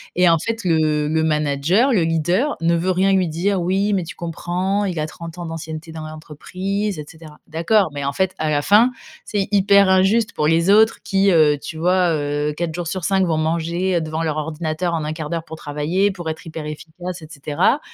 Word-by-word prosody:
et 180 0 +5
en 165 - +5
fait, 225 +6 -4
le 155 -3 +2
le 160 +1 +1
manager, 155 - +2
le 180 -6 +3
leader, 175 - 0
ne 170 +1 +2
veut 175 +3 0
rien 190 +2 +2
lui 185 -2 +2
dire: 180 +5 0
«Oui, 195 +4 +1
mais 185 -3 0
tu 165 - -8
comprends, 180 +4 -2
il 180 -5 -3
a 155 - -1
30 170 +2 -9
ans 175 - -5
d'ancienneté 160 0 -7
dans 160 -1 -7
l'entreprise, 185 +5 -4
et 150 - -6
cetera». 160 -2 -14
D'accord, 170 +5 +2
mais 145 -1 -4
en 140 - -1
fait, 190 +3 0
à 155 -1 -1
la 145 -1 +1
fin, 215 +9 +5 0.3
c'est 200 -2 -1
hyper 200 -1 +5
injuste 190 +4 +3
pour 150 - -1
les 165 +3 +2
autres 220 +2 +4
qui, 195 0 +2
heu, 155 -3 +4
tu 160 - -8
vois, 180 +1 +2
heu, 145 0 -1
4 165 -1 -3
jours 175 -1 -4
sur 185 +1 -4
5 195 0 +2
vont 160 -3 0
manger 170 +3 0
devant 160 +1 -3
leur 155 -2 -1
ordinateur 160 +2 -2
en 160 - -1
1/4 155 0 -5
d'heure, 165 - -1
pour 160 - -9
travailler, 160 +7 -1
pour 175 -4 -6
être 160 - -6
hyper 160 -1 -7
efficace, 165 +3 -7
et 155 - -10
cetera, 150 - 0
170 Hz, 215 wpm, -20 LUFS, 155-190 Hz, 0.3 s, et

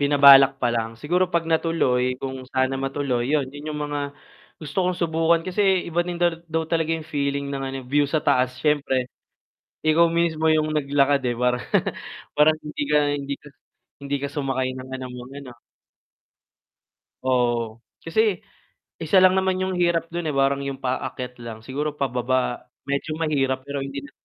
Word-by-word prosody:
binabalak 140 -1 +8
pa 120 - +2
lang, 115 -1 -1
siguro 180 +4 +1
'pag 170 -1 +1
natuloy 130 -6 +1
kung 130 -1 -4 0.2
sana 130 0 +1
matuloy 135 -3 -1
yun, 145 -3 +2
yun 145 +1 -8
yung 150 - -5
mga 145 0 -3 0.6
gusto 155 +4 -2
kong 180 -1 0
subukan 165 0 +2
kasi 185 +2 -2 0.3
iba 170 +1 0
din 175 0 -4
daw 175 -1 +3 0.2
daw 160 0 -1
talaga 165 0 0
yung 160 - -8
feeling 140 -1 -1
ng 135 -1 -3
ano 135 - -5
view 145 +3 +2
sa 155 +2 +1
taas 125 0 +2
s'yempre. 140 -4 +1 0.8
Ikaw 160 +2 +5
mismo 165 -2 +1
yung 155 0 +2
naglakad, 140 -1 +2
eh, 120 -1 0
parang 125 0 +1 0.8
parang 155 +1 +5
hindi 150 -1 -4
ka 150 - +4 0.2
hindi 140 0 -4
ka - - -14 0.5
hindi 140 0 -2
ka 140 - -1
sumakay 135 -3 -1
ng 130 0 -9
ano, 130 -1 -5
mga 125 +2 -10
ano. 130 - -10 1.7
Oo, 120 -3 0 0.2
kasi 200 +2 +1 0.6
isa 165 +4 +3
lang 185 0 +6
naman 190 0 0
yung 185 0 -1
hirap 170 -1 +1
dun, 170 -1 -4
eh, 150 - -2
parang 135 0 +2
yung 135 -1 -5
paakyat 125 -1 -4
lang 115 -2 -8
siguro 145 +5 -3
pababa 130 -2 -1 0.2
medyo 140 +2 -2
mahirap 135 -4 0
pero 140 +1 -5
hindi 135 0 -6
na, 140 - -11
140 Hz, 170 wpm, -23 LUFS, 130-160 Hz, 1.7 s, binabalak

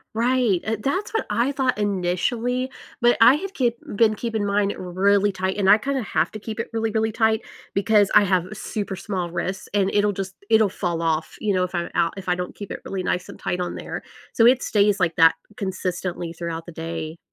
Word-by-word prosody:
Right, 235 -4 +2
eh 225 0 -1
that's 375 +12 -1
what 445 - -1
I 235 +6 +1
thought 265 -4 0
initially, 210 +6 -1 0.3
but 240 0 +4
I 240 +4 +8
had 390 +5 -5
kip 240 -6 +1 0.2
been 215 0 +4
keeping 225 0 -2
in 205 - -1
mine 200 0 +1
really 195 +3 +2
tight, 190 0 -2
and 195 -2 +2
I 205 - +8
kinda 270 +4 -2
have 170 -6 0
to 215 - -7
keep 220 +1 -6
it 230 - -2
really, 225 0 0
really 220 +1 0
tight 220 0 +2 0.3
because 205 0 +4
I 210 - +8
have 185 -3 +2
super 205 -2 -4
small 185 -2 -3
wrists, 190 +3 -4
and 195 -1 +1
it'll 205 0 +3
just 195 -1 -5
it'll 220 -1 +5
fall 170 -3 -2
off, 160 -1 -1
you 210 -2 0
know, 185 -1 +2
if 180 0 -4
I'm 170 0 -2
out 165 - +1
if 195 - -8
I 180 - +3
don't 180 0 -5
keep 205 - -8
it - - -6
really 190 -1 -3
nice 180 0 -2
and - - -9
tight 180 - -3
on 180 - -3
there, - - -6 0.3
so 230 - +5
it 255 +1 +4
stays 205 -1 +2
like 170 -3 +1
that, 165 -1 +6 0.2
consistently, 180 -3 -3
throughout 165 -1 -5
the 175 - -9
day. 160 0 -5
200 Hz, 220 wpm, -23 LUFS, 180-225 Hz, 0.3 s, I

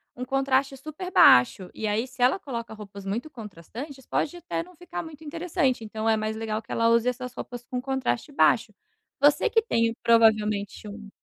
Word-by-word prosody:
um 250 - -5
contraste 270 +1 +1
super 310 +7 -8
baixo. 180 - +6
E 220 - -3
aí 215 +4 0
se 255 - -11
ela 255 +10 +4
coloca 235 -9 -6
roupas 200 -2 -10
muito 230 +10 -3
contrastantes, 240 - -9
pode 300 - -1
até 345 -1 -4
não 360 +1 -17
ficar 355 +1 -6
muito 320 -1 -11
interessante. 315 -5 -1
Então, 220 +1 -2
é 220 - +3
mais 215 0 -2
legal 220 -1 -3
que 225 - -14
ela 230 0 +2
use 230 +1 +3
essas 250 0 -3
roupas 245 -1 -7
com 255 0 -5
um - - -2
contraste 265 0 -2
baixo. 285 - +3 0.5
Você 290 +1 +4
que 450 - +3
tem 230 - +1
provavelmente 215 -3 +3
um 210 0 -9
245 Hz, 190 wpm, -26 LUFS, 220-280 Hz, 0.5 s, baixo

